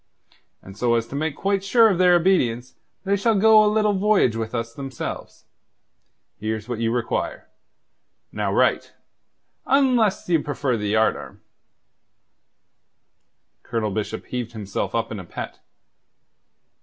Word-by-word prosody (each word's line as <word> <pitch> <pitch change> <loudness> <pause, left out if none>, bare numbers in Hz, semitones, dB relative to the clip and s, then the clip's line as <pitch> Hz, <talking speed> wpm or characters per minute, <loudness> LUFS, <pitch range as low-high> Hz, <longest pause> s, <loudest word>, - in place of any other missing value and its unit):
And 95 - -12
so 120 +2 +1
as 115 -1 0
to - - -7
make 155 +1 -2
quite 195 0 -1
sure 225 +3 +5
of 190 -5 0
their 180 -1 +5
obedience, 130 -10 +1 0.3
they 195 +1 +1
shall 220 +3 +1
go 215 +1 +6
a 210 - +3
little 215 -1 +2
voyage 195 - +2
with 115 +1 -4
us, 115 0 -3
themselves. 135 0 -7 0.9
Here's 110 +1 -4
what 120 -3 -4
you 115 0 0
require. 120 -1 -3 0.8
Now - - -2
write - - +1 0.7
unless 250 -7 +2
you 165 -3 +2
prefer 140 -3 -2
the 105 -2 -3
yardarm." 110 0 0 2.2
Colonel 115 -3 -3
Bishop 110 +2 -4
heaved 120 -2 -5
himself 105 -1 -4
up 115 0 -1
in 105 - -5
a - - -7
pet. 85 - -8
130 Hz, 135 wpm, -23 LUFS, -, 2.2 s, go